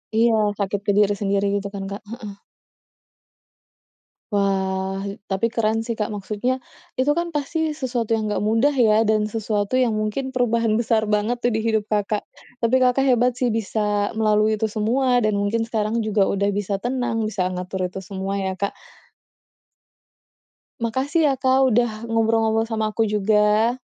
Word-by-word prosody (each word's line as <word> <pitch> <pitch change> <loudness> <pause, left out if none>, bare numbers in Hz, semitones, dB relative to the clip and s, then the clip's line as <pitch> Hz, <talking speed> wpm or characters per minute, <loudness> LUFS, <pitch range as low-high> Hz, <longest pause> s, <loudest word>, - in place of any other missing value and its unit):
Iya, 230 +1 +4 0.3
takut 200 0 -1
ke 205 - +1
diri 205 -1 +4
sendiri 200 0 +1
gitu 200 0 -2
kan 195 -1 -5
Kak? 200 - -6
Heeh. 225 -4 -7 2.0
Wah 195 -1 0
e 200 0 -6
tapi 195 +4 0
keren 225 -1 0
sih 235 - -4
Kak. 210 - 0
Maksudnya 215 +5 -3 0.3
itu 260 +3 +2
kan 340 0 -2
pasti 305 +2 -1
sesuatu 240 -6 -1
yang 215 -1 -2
enggak - - 0
mudah 225 +7 +2
ya 225 -5 +4
dan 215 -1 +1
sesuatu 215 0 -2
yang 255 -2 +3
mungkin 215 +5 -2
perubahan 230 -3 +1
besar 225 -2 +1
banget 215 +3 -1
tuh 245 - +2
di 220 - 0
hidup 220 -1 +1
Kakak. 210 0 0 0.4
Tapi 230 +2 +3
Kakak 255 +1 +3
hebat 245 0 +2
sih 245 -1 0
bisa 210 -1 0
melalui 215 0 +2
itu 215 0 -2
semua 245 +4 +2
dan 215 -2 +1
mungkin 220 +3 0
sekarang 220 0 -1
juga 215 -3 +1
udah 200 0 0
bisa 200 -1 -2
tenang 240 -2 -1
bisa 205 -4 -2
ngatur 185 0 -3
itu 190 - -6
semua 195 +1 -4
ya 190 -1 -2
Kak. 200 +1 -2 2.1
Makasih 270 +8 0
ya 275 - +3
Kak 260 0 +3
udah 240 0 +2 0.2
ngobrol-ngobrol 225 0 +2
sama 220 -1 -1
aku 225 - +2
juga. 210 +3 +3
220 Hz, 160 wpm, -22 LUFS, 205-240 Hz, 2.1 s, Iya